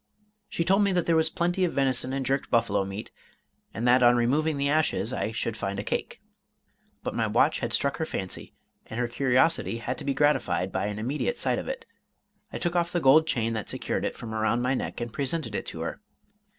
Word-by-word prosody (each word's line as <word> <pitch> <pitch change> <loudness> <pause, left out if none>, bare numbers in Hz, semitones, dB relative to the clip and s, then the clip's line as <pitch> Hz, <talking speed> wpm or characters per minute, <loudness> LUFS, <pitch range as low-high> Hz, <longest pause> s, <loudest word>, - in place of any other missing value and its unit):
She 170 - -1
told 195 +4 +3
me 200 - +2
that 175 -1 +1
there 165 - +3
was 160 0 +3
plenty 175 +3 0
of 175 - +1
venison 130 -2 +1
and 135 0 -2
jerked 135 +1 0
buffalo 110 -4 +2
meat, 100 +2 -6 0.6
and 120 +2 -2
that 125 +1 +5
on 120 0 +6
removing 145 +6 +1
the 140 0 +1
ashes 140 -7 +1
I 110 - -1
should 115 0 -2
find 100 -2 -3
a 100 - -3
cake. - - -3 0.8
But - - -3
my - - 0
watch - - +3
had - - -3
struck 140 -1 +1
her 160 - -1
fancy, 95 -9 -5 0.3
and 110 - -5
her 125 - +1
curiosity 130 +1 +2
had 120 +2 -4
to - - -6
be 140 -1 -1
gratified 135 -10 +1
by 95 +2 -1
an 105 0 -4
immediate 140 - -2
sight - - 0
of - - -7
it. - - -5 0.7
I - - -4
took 175 0 -2
off 170 0 +1
the 175 - +1
gold 155 +2 +6
chain 115 -7 0
that 110 -3 -4
secured - - -2
it, - - -2
from 110 -2 -7
around 110 +2 +1
my 125 +1 +2
neck, 130 - -3
and 120 -1 -4
presented 140 -3 -2
it - - -3
to - - -6
her. - - -4
130 Hz, 225 wpm, -27 LUFS, 115-160 Hz, 0.8 s, on